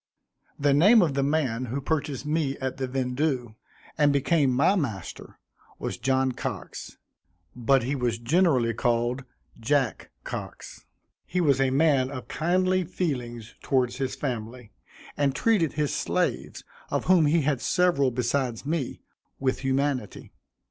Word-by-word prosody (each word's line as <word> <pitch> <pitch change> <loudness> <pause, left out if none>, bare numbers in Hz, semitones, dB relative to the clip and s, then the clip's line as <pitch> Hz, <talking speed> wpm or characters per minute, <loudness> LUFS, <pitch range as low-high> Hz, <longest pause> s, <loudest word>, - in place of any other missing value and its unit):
The 145 0 +2
name 200 +9 +6
of 155 -5 0
the 140 - 0
man 135 -4 0
who 125 +4 -3
purchased 145 -2 -2
me 150 -2 -1
at 130 -2 -4
the 130 -1 -2
vendue, 125 -1 -1 0.5
and 145 -1 +5
became 140 +1 +2
my 140 +10 +3
master, 120 - -4 0.4
was - - -5
John 130 +1 +1
Cox; - - -6 0.6
but 125 +1 +2
he 130 +4 -1
was 125 -4 -1
generally 125 -2 +2
called 120 +3 0 0.4
Jack 135 +1 0
Cox. - - -8 0.4
He 180 - -1
was 140 -6 +3
a 135 - +3
man 135 -2 +3
of 130 -2 -7
kindly 185 +3 +1
feelings 125 -10 -4
towards 125 -2 0
his 135 -1 -2
family, 120 -3 -5 0.4
and 140 -2 +1
treated 205 -9 +2
his 150 -2 -1
slaves, - - -2 0.3
of - - -1
whom 180 -4 +5
he 160 +2 +3
had 140 -3 0
several 175 -7 +2
besides 125 0 -1
me, 150 -3 -3 0.4
with 130 -1 0
humanity. 135 -3 -2
135 Hz, 140 wpm, -26 LUFS, 125-150 Hz, 0.6 s, name